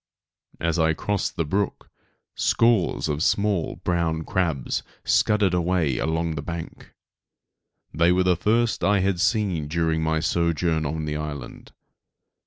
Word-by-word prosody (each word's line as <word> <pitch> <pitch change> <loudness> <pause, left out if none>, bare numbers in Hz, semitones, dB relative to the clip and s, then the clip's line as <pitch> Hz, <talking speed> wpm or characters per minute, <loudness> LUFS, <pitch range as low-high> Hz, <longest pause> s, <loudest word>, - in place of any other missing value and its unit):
As 85 +1 0
I 80 0 +3
crossed 100 +3 -2
the 85 - -1
brook, 95 +5 -2 0.5
scores 115 -9 +2
of 75 0 -2
small 100 -1 +1
brown 85 -2 0
crabs 80 -8 -1 0.2
scudded 105 -4 +2
away 85 -6 +1
along 80 +1 -1
the 75 - -4
bank. 85 +2 -7 1.0
They 85 +3 +3
were 90 +1 +3
the 90 -1 +3
first 115 +6 +1
I 100 -1 +3
had 95 -2 0
seen 100 -7 +1
during 80 0 0
my 80 0 +1
sojourn 85 -1 0
on 80 +1 -3
the 75 0 -3
island. 75 -4 -7
85 Hz, 135 wpm, -24 LUFS, 80-95 Hz, 1.0 s, I